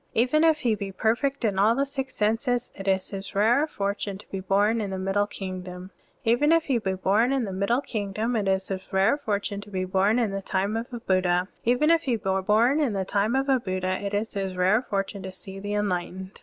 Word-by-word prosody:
Even 255 Hz, +7 st, +3 dB
if 320 Hz, -2 st, +4 dB
he 235 Hz, -3 st, +2 dB
be 200 Hz, -2 st, -4 dB
per 220 Hz, +4 st, +1 dB
fect 275 Hz, -1 st, -2 dB
in 200 Hz, -3 st, 0 dB
all 215 Hz, +4 st, +4 dB
the 275 Hz, +2 st, +1 dB
six 270 Hz, -1 st, -5 dB
senses, 240 Hz, +3 st, 0 dB
it 195 Hz, 0 st, -8 dB
is 190 Hz, -1 st, +1 dB
his 195 Hz, -1 st, -7 dB
rare 240 Hz, +9 st, +3 dB
forttme 200 Hz, -4 st, -3 dB
to 210 Hz, -, -14 dB
be 195 Hz, -, -3 dB
bom 205 Hz, +4 st, +2 dB
in 205 Hz, -, -3 dB
the 190 Hz, -, -3 dB
middle 195 Hz, +2 st, 0 dB
kingdom. 185 Hz, -2 st, -7 dB, 0.3 s
Even 240 Hz, +7 st, +3 dB
if 330 Hz, -1 st, +4 dB
he 260 Hz, -4 st, +1 dB
be 190 Hz, -3 st, -2 dB
bom 205 Hz, +7 st, +2 dB
in 270 Hz, -2 st, +1 dB
the 195 Hz, -, -5 dB
middle 200 Hz, +7 st, +1 dB
kingdom, 215 Hz, 0 st, -2 dB
it 210 Hz, -3 st, 0 dB
is 190 Hz, 0 st, 0 dB
his 190 Hz, -1 st, -5 dB
rare 195 Hz, +7 st, +3 dB
fortune 205 Hz, -7 st, -3 dB
to 205 Hz, -, -12 dB
be 185 Hz, -2 st, -2 dB
bom 195 Hz, +4 st, +2 dB
in 230 Hz, -5 st, +1 dB
the 195 Hz, 0 st, -3 dB
time 195 Hz, +2 st, -1 dB
of 230 Hz, +3 st, -4 dB
a 240 Hz, -, -5 dB
Buddha. 185 Hz, -3 st, +1 dB, 0.2 s
Even 250 Hz, +7 st, +3 dB
if 330 Hz, 0 st, +3 dB
he 250 Hz, -3 st, +1 dB
be 190 Hz, -3 st, -1 dB
bom 230 Hz, +9 st, +3 dB
in 280 Hz, -8 st, +1 dB
the 190 Hz, -1 st, -1 dB
time 205 Hz, +5 st, +1 dB
of 270 Hz, +1 st, +1 dB
a 265 Hz, -2 st, +3 dB
Buddha, 185 Hz, -2 st, -2 dB
it 200 Hz, 0 st, -2 dB
is 215 Hz, +2 st, -2 dB
his 195 Hz, -2 st, -3 dB
rare 190 Hz, +5 st, +3 dB
forttme 200 Hz, -4 st, -3 dB
to 190 Hz, 0 st, -6 dB
see 190 Hz, +1 st, -10 dB
the 205 Hz, +1 st, -3 dB
enlightened. 190 Hz, -1 st, -3 dB
205 Hz, 240 wpm, -26 LUFS, 190-240 Hz, 0.3 s, if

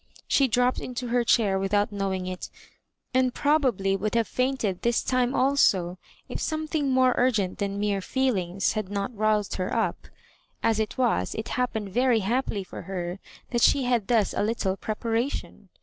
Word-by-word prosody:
She 275 Hz, -, +3 dB
dropped 250 Hz, +1 st, +2 dB
into 250 Hz, -1 st, -5 dB
her 240 Hz, 0 st, +2 dB
chair 205 Hz, -5 st, +3 dB
without 205 Hz, +2 st, +1 dB
knowing 195 Hz, -2 st, -2 dB
it, 185 Hz, 0 st, -5 dB, 0.6 s
and 255 Hz, -1 st, +2 dB
probably 255 Hz, -10 st, +2 dB
would 210 Hz, +3 st, -2 dB
have 230 Hz, -1 st, +2 dB
fainted 250 Hz, -8 st, -1 dB
this 235 Hz, 0 st, +1 dB
time 255 Hz, 0 st, +1 dB
also, 190 Hz, -10 st, +2 dB, 0.3 s
if -, -, -5 dB
something 310 Hz, -2 st, -1 dB
more 255 Hz, -1 st, +4 dB
urgent 215 Hz, -7 st, +1 dB
than 200 Hz, 0 st, -2 dB
mere 205 Hz, -1 st, 0 dB
''feelings" 195 Hz, -5 st, 0 dB
had 215 Hz, -3 st, -3 dB
not 200 Hz, +3 st, -3 dB
roused 215 Hz, -1 st, +1 dB
her 185 Hz, -1 st, -2 dB
up. -, -, -1 dB, 0.6 s
As 225 Hz, -1 st, +2 dB
it 220 Hz, -, -2 dB
was, 250 Hz, -3 st, +1 dB
it 220 Hz, -, -4 dB
happened 220 Hz, -5 st, -2 dB
very 245 Hz, +2 st, +2 dB
happily 220 Hz, -1 st, -1 dB
for -, -, -9 dB
her 180 Hz, -1 st, -5 dB, 0.3 s
that 240 Hz, -1 st, 0 dB
she 275 Hz, -, +4 dB
had 240 Hz, -5 st, +1 dB
thus 225 Hz, -5 st, +2 dB
a -, -, -1 dB
little 205 Hz, -3 st, 0 dB
preparation. 225 Hz, +5 st, -3 dB
220 Hz, 165 wpm, -26 LUFS, 195-250 Hz, 0.6 s, more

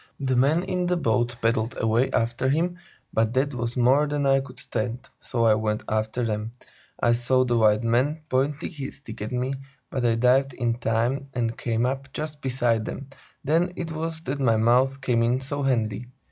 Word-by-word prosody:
The 130 Hz, -2 st, 0 dB
men 145 Hz, +7 st, +3 dB
in 180 Hz, -1 st, -1 dB
the 180 Hz, 0 st, +1 dB
boat 120 Hz, -4 st, +1 dB
paddled 115 Hz, 0 st, +1 dB
away 115 Hz, +4 st, +2 dB
after 120 Hz, +3 st, 0 dB
him, 175 Hz, +5 st, 0 dB, 0.3 s
but 110 Hz, +2 st, +1 dB
that 140 Hz, +2 st, +1 dB
was 120 Hz, 0 st, -3 dB
more 130 Hz, +5 st, +4 dB
than 145 Hz, -1 st, -1 dB
I 135 Hz, 0 st, +4 dB
could 130 Hz, -2 st, -9 dB
stand, 125 Hz, -1 st, -4 dB
so 115 Hz, -2 st, -1 dB
I 110 Hz, -, +6 dB
went 110 Hz, 0 st, -1 dB
after 110 Hz, +3 st, -1 dB
them. 110 Hz, +1 st, -3 dB, 0.5 s
I 120 Hz, -, +3 dB
saw 125 Hz, +2 st, +2 dB
the 120 Hz, -1 st, +1 dB
white 105 Hz, 0 st, +4 dB
man 130 Hz, +7 st, +1 dB
point 140 Hz, +2 st, 0 dB
his 140 Hz, -5 st, -5 dB
stick 140 Hz, -, -11 dB
at 105 Hz, -, -4 dB
me, 125 Hz, +2 st, -1 dB, 0.4 s
but 130 Hz, -, -2 dB
I 115 Hz, -1 st, +3 dB
dived 125 Hz, +3 st, +3 dB
in 120 Hz, -2 st, -1 dB
time 120 Hz, +4 st, 0 dB
and 115 Hz, -2 st, -1 dB
came 115 Hz, 0 st, 0 dB
up 135 Hz, +2 st, -3 dB
just 150 Hz, -1 st, -5 dB
beside 120 Hz, -4 st, +1 dB
them; 140 Hz, +3 st, -6 dB, 0.3 s
then 165 Hz, +5 st, +1 dB
it 170 Hz, -2 st, -4 dB
was 160 Hz, 0 st, -4 dB
that 140 Hz, -3 st, -3 dB
my 115 Hz, -5 st, +3 dB
mouth 130 Hz, +4 st, +3 dB
came 120 Hz, -2 st, +1 dB
in 120 Hz, +2 st, +2 dB
so 145 Hz, +2 st, -4 dB
handy. 120 Hz, -4 st, 0 dB
125 Hz, 195 wpm, -25 LUFS, 115-140 Hz, 0.5 s, I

